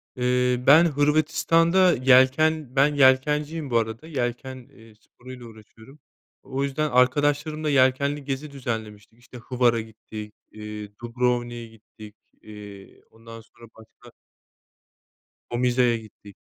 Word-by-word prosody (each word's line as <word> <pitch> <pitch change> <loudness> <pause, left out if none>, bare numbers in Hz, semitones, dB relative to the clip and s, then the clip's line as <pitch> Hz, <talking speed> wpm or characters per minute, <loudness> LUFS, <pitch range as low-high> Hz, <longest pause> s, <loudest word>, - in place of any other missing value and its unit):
Eee, 125 0 0
ben 160 +5 +7
Hırvatistan'da 165 +4 +2
yelken, 130 +3 +3
ben 145 +2 +3
yelkenciyim 145 +3 +2
bu 120 - +1
arada 115 +6 -3
yelken, 130 -2 -4 0.2
eee, 115 -3 -18
sporu 125 +3 -16
ile 125 -2 -11
uğraşıyorum. 110 +5 -16 0.4
O 135 +1 -4
yüzden 145 +2 -2
arkadaşlarımla 145 +4 +1
yelkenli 140 +2 +1
gezi 140 +2 -5
düzenlemiştik. 110 -4 -7
İşte 125 0 -14
Hvar'a 120 -1 0
gittik, 110 -1 -11 0.2
iii, 105 -1 -9
Dubrovnik'e 120 0 -2
gittik, 110 -1 -16 0.3
iii. 105 -2 -13
Ondan 115 0 -13
sonra 115 +1 -18
başka 115 +2 -18 1.4
Omiza'ya 125 0 +1
gittik. 105 -2 -15
125 Hz, 115 wpm, -24 LUFS, 115-145 Hz, 1.4 s, ben